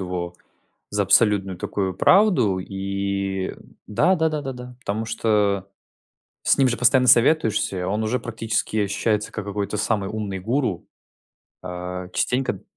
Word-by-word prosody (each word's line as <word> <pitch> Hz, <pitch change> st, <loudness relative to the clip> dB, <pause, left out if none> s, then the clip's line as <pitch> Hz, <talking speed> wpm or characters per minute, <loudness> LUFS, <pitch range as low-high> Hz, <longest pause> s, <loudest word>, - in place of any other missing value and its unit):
его 90 Hz, -1 st, -4 dB, 0.6 s
за 100 Hz, 0 st, +1 dB
абсолютную 100 Hz, -1 st, +3 dB
такую 95 Hz, -1 st, -2 dB
правду 175 Hz, -, +4 dB
и 100 Hz, 0 st, -3 dB, 0.3 s
да 165 Hz, -, +2 dB
да 160 Hz, -1 st, +2 dB
да 155 Hz, -1 st, -3 dB
да 135 Hz, -1 st, -4 dB
да. 125 Hz, 0 st, -10 dB
Потому 110 Hz, -1 st, -3 dB
что 105 Hz, -4 st, 0 dB, 0.8 s
с -, -, +4 dB
ним 135 Hz, -, +4 dB
же 120 Hz, -1 st, 0 dB
постоянно 125 Hz, +2 st, +4 dB
советуешься, 115 Hz, -, +3 dB
и 90 Hz, -, -3 dB
он 105 Hz, +4 st, -1 dB
уже 115 Hz, +4 st, 0 dB
практически 110 Hz, -2 st, -2 dB
ощущается, 105 Hz, +1 st, 0 dB
как 105 Hz, -, -5 dB
какой-то 100 Hz, 0 st, -3 dB
самый 105 Hz, -2 st, 0 dB
умный 105 Hz, -3 st, -4 dB
гуру. 115 Hz, -1 st, -1 dB, 0.8 s
Э, 90 Hz, 0 st, -5 dB
частенько, 130 Hz, +1 st, 0 dB
д -, -, -13 dB
105 Hz, 145 wpm, -23 LUFS, 95-120 Hz, 0.8 s, правду